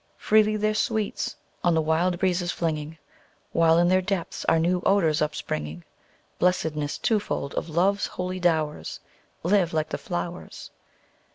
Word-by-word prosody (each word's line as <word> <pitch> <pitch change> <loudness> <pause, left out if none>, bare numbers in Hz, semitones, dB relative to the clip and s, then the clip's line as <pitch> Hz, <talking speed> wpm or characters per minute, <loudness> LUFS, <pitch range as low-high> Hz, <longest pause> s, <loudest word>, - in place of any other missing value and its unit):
Freely 215 0 +3
their 215 0 +1
sweets 215 -1 -1 0.3
on 175 -1 +3
the - - +3
wild 170 +3 +1
breezes 180 -1 0
flinging, 160 -2 -3 0.5
While 165 0 +4
in 175 +1 +4
their 185 +1 +4
depths 185 -2 -3
are - - +4
new 175 +2 +1
odors 165 -6 +3
upspringing: 80 - -3 0.6
(Blessedness 160 -5 0
twofold 210 - -1
of 165 - -3
Love's 190 +5 +2
holy 185 0 -4
dowers,) 155 - 0 0.4
Live 180 -1 +2
like 155 0 0
the - - -3
flowers! 175 -4 -6
175 Hz, 135 wpm, -25 LUFS, 160-185 Hz, 0.6 s, While